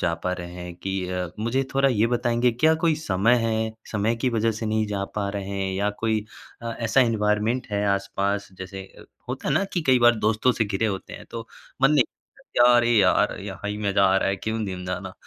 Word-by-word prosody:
जा 85 - +1
पा 90 - +1
रहे 90 -1 -6
हैं? 90 -1 -7
कि 95 +2 -3
अ, 90 -1 -2
मुझे 120 +5 0
थोड़ा 135 0 +4
ये 115 -3 +2
बताएँगे? 120 0 +1
क्या 155 +7 +3
कोई 165 -2 +4
समय 115 -6 +2
है, 110 0 -1 0.2
समय 110 +2 +1
की 120 +3 0
वजह 115 -1 +1
से 110 +1 -4
नहीं 110 0 0
जा 100 -1 -2
पा 100 -1 -1
रहे 100 -1 -4
हैं 95 -1 -1
या 100 +2 0
कोई 110 -2 +1 0.4
अ, 115 0 -3
ऐसा 115 +3 +2
एनवायरनमेंट 110 +1 +1
है 100 0 0
आस-पास? 100 +1 -2
जैसे 95 +1 -7
अ, - - -13 0.2
होता - - -4
है - - +2
ना 200 - +2
कि 175 - 0
कई 130 -1 +5
बार 120 0 +6
दोस्तों 110 +3 +3
से 115 - 0
घिरे 105 +1 -1
होते 95 -3 -4
हैं, - - -9
तो 115 -1 -6 0.4
मन 135 - +6
नहीं 145 -5 +5 0.5
"क्या? 120 - +6
अरे! 120 0 +3
यार, 105 -6 +3
यहाँ 105 - -6
ही 105 - -4
मज़ा 100 -1 +2
आ 95 0 +4
रहा - - +1
है, 95 - 0
क्यों 110 +2 -3
जिम 90 -2 -5
जाना?" 90 0 -4
110 Hz, 230 wpm, -24 LUFS, 100-120 Hz, 0.5 s, बार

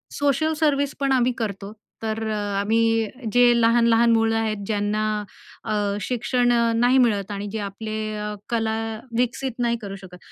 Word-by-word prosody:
Social 290 +2 +1
service 285 -3 +1
पण 275 -1 0
आम्ही 255 -1 +3
करतो. 205 -2 -4 0.3
तर 220 0 -2
अ, - - -1 0.2
आम्ही 225 +1 +2 0.3
जे 245 0 +5 0.2
लहान-लहान 230 0 +4
मुलं 225 0 +2
आहेत, 220 -1 -1
ज्यांना 210 0 0 0.6
अ, 215 - -1 0.3
शिक्षण 245 +2 0
अ, 235 -1 +2
नाही 245 +3 +4
मिळत 210 -5 +2
आणि 205 0 -4
जे 220 - -3
आपले 205 +2 -5 0.2
अ, 210 0 -4 0.2
कला 225 -2 0 0.4
विकसित 250 +2 0
नाही 235 -1 +1
करू 200 -2 -6
शकत, 190 -2 -12
225 Hz, 155 wpm, -23 LUFS, 210-245 Hz, 0.6 s, जे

